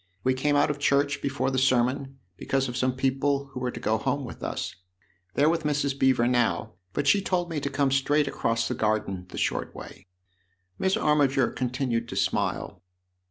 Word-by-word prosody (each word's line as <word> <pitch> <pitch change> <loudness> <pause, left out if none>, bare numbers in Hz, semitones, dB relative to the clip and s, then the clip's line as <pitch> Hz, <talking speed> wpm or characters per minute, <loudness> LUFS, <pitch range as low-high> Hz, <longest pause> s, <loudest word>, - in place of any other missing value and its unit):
We 130 - +3
came 145 +3 +1
out 145 +1 +3
of 145 - -6
church 145 0 +2
before 140 0 -1
the 130 - +1
sermon, 130 +1 +1 0.2
because 135 +7 -1
of 120 - -5
some 130 0 +1
people 135 +1 0
who - - -4
were 125 -1 -1
to - - -6
go 110 0 0
home 140 +4 -1
with - - -9
us. - - -4 0.6
They're 145 - +4
with 165 +1 +2
Mrs. 145 -2 0
Beever 130 -3 +3
now, 120 -3 +1 0.2
but 140 - -2
she 195 +8 +4
told 175 -2 -1
me 155 - -1
to 140 - -2
come 140 0 +1
straight 145 +2 +2
across 115 -3 0
the - - -1
garden 105 -4 -1
the - - -9
short - - -1
way." - - -11 0.7
Miss 190 0 +2
Armiger 140 -4 +2
continued 125 -2 -2
to - - -5
smile. - - -1
135 Hz, 190 wpm, -26 LUFS, 125-145 Hz, 0.7 s, They're